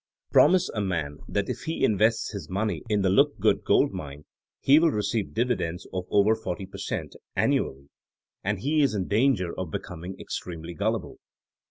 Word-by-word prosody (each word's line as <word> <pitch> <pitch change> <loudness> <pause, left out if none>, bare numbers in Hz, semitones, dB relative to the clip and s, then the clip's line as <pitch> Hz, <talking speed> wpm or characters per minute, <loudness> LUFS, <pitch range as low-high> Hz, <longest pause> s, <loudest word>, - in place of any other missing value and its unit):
Promise 185 -1 +5
a 105 - -2
man 80 -7 -2
that 100 -1 -1
if - - -5
he 160 0 -2
invests 110 +2 +2
his 100 -4 -7
money 100 -2 -1
in 105 -2 +2
the 95 - +3
Lookgood 95 - +3
Gold - - +3
Mine 75 +1 -7 0.3
he 140 +3 +6
will 165 0 +4
receive 105 -3 -2
divi 125 +2 +2
dends 85 -1 -4
of 90 -1 -3
over 105 +2 +4
40 100 -3 -4
per 95 - -11
cent. - - -4 0.2
aonuaJlyy 70 +1 0 0.6
and 100 0 -1
he 150 +4 +2
is 135 -7 +2
in 95 -3 -2
danger 105 -5 +2
of 95 -3 -4
becoming 90 +3 -6
extremely 85 -1 -6
gullible. 105 +2 -2
100 Hz, 175 wpm, -26 LUFS, 90-110 Hz, 0.6 s, he